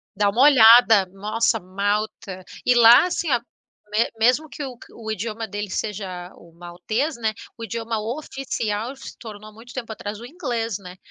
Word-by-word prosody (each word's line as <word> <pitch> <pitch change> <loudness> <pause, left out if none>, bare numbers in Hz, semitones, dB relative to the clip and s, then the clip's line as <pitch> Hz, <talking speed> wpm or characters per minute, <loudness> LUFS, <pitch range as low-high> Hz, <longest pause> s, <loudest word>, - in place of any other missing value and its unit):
Dá 205 0 +2
uma 235 +6 0
olhada. 230 -6 +7
Nossa, 215 +4 -1
Malta. 200 0 -3 0.2
E 250 - +4
lá 240 +6 +8
assim 340 -3 -2
a 245 -2 +3 0.5
me 220 +2 +1
mesmo 250 +7 +2
que 290 - -7
o 255 -3 -7
que - - -15
o 220 -2 -6
idioma 220 +2 -4
dele 205 0 -5
seja 185 -3 -5
o 170 -1 -18
maltês, 200 - -3
né, 220 -2 -1 0.2
o 230 - -8
idioma 230 0 -3
oficial 240 -2 -4
se 270 - -11
tornou, 215 -2 -11
muito 235 +3 -14
tempo 235 -4 -6
atrás, 205 -1 -6
o - - -8
inglês, 240 - -3
né. 180 -1 -11
220 Hz, 175 wpm, -22 LUFS, 205-240 Hz, 0.5 s, lá